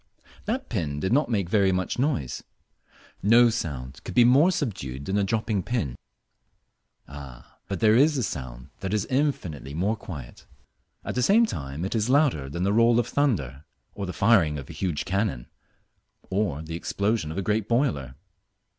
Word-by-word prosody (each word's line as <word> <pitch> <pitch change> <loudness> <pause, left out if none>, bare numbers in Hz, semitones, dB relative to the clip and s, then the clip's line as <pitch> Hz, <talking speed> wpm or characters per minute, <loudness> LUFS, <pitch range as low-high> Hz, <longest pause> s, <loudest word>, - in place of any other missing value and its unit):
That 250 +5 -2
pin 80 - -2
did 95 +9 0
not 145 +1 +2
make 100 -5 -1
much 95 -1 +2
noise. 125 - -1 0.8
No 115 +3 +6
sound 70 - -5
could - - -7
be 120 - +7
more 135 +8 +6
subdued 70 - -4
than 95 - -2
a - - +2
dropping 110 0 0
pin. 90 - -2 1.1
Ah, 70 -4 -12
but 100 -3 -4
there 110 0 +5
is 145 +4 +4
a 130 - 0
sound 65 - -6
that 95 +2 -2
is 105 0 0
infinitely 90 - -1
more 100 +7 0
quiet. 75 - -10 0.6
At - - -3
the 125 - 0
same 215 - +5
time 70 - -5
it 95 - -3
is 110 0 0
louder 130 - +2
than 85 +6 -3
the 100 +1 +2
roll 115 +1 +4
of 120 - +1
thunder, 80 - 0 0.3
or 100 -2 -5
the - - -3
firing 95 -8 +3
of 70 - -8
a - - -10
huge 90 -6 -2
cannon, 95 - -1 0.9
or 95 -7 -1
the 80 +1 -6
explosion 100 -1 -1
of 80 - -6
a 100 - -1
great 105 +1 0
boiler. 75 - 0
100 Hz, 170 wpm, -26 LUFS, 75-120 Hz, 1.1 s, be